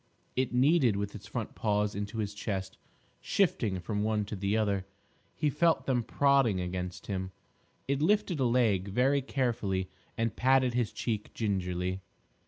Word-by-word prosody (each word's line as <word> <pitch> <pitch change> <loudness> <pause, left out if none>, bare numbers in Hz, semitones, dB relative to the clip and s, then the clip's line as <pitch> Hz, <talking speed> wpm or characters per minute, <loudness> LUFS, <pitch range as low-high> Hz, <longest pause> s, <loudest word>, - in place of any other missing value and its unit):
It 130 0 0
kneaded 130 -2 +4
with 100 0 -3
its 100 -2 -9
front 115 0 -4
paws 105 -1 0
into 100 +3 -4
his 105 -2 -2
chest, 100 -2 -4 0.4
shifting 115 - +1
from 105 +4 -2
one 105 -1 +1
to 105 - -5
the 100 +2 0
other. 100 -3 0 0.5
He 150 -2 +1
felt 165 +3 +2
them 125 -3 +2
prodding 135 -5 +3
against 90 0 -4
him. 95 -2 -3 0.6
It 140 +1 0
lifted 200 -2 +2
a 130 - +2
leg 115 -6 +2
very 130 +7 +2
carefully 115 -9 -1 0.3
and 115 -1 0
patted 130 -1 +3
his 120 -3 0
cheek 110 -3 -3
gingerly. 95 -3 -1
110 Hz, 155 wpm, -30 LUFS, 100-130 Hz, 0.6 s, kneaded